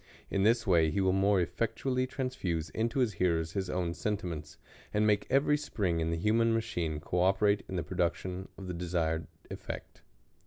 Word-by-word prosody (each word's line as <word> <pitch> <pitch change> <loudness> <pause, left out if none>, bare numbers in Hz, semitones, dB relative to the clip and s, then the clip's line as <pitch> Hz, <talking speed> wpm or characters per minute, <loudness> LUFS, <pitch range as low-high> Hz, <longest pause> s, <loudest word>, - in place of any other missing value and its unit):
In 100 - +1
this 115 +3 +3
way 85 -4 +4
he 85 - -1
will 95 -1 +3
more 95 -1 +3
elTectually 130 +6 -1
transfuse 100 - -2
into 115 +4 0
his 115 -5 +1
hearers 80 -3 +2
his 95 -1 -2
own 90 -2 -1
sentiments, 85 -7 -4 0.3
and 105 +1 +2
make 105 -1 +2
every 140 +3 +3
spring 95 - -1
in 80 0 0
the 85 - 0
human 115 +4 +3
machine 90 -9 -2
co 90 +4 -2
operate 100 +2 +3
in 95 - -4
the 85 - -1
production 90 +1 -2
of 95 - -8
the 90 - -4
desired 85 -2 -1 0.2
effect. - - -7
95 Hz, 180 wpm, -31 LUFS, 85-110 Hz, 0.3 s, way